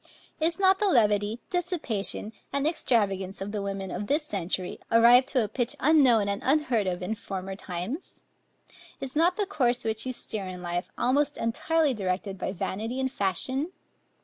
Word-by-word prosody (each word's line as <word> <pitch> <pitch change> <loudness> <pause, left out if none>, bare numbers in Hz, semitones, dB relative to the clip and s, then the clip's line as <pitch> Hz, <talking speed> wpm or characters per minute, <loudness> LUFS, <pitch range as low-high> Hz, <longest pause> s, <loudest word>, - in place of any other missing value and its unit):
Is 330 +1 +1
not 380 -1 +4
the 420 - +2
levity, 210 - +3
dissipation, 300 - -2 0.2
and 280 0 0
extravagance 200 - 0
of 195 +1 -4
the 210 -1 -3
women 195 -1 -4
of 205 +3 -4
this 295 +3 +2
century 185 - -3
arrived 235 +3 +7
to 255 -4 +2
a - - -2
pitch 235 +3 -1
unknown 260 -8 +5
and 200 +3 -2
unheard 260 -7 +2
of 180 0 -2
in 210 - -1
former 195 -2 -5
times? 190 - -6 0.8
Is 265 0 -4
not 340 +4 +3
the 415 - 0
course 250 -11 0
which 220 +2 -1
you - - -1
steer 215 -5 -4
in 180 -1 -7
life, 175 0 -3
almost 285 +3 +1
entirely 300 +6 +1
directed 190 -2 -3
by - - -2
vanity 220 +6 -3
and 260 -1 0
fashion? 260 - -1
230 Hz, 170 wpm, -27 LUFS, 195-285 Hz, 0.8 s, arrived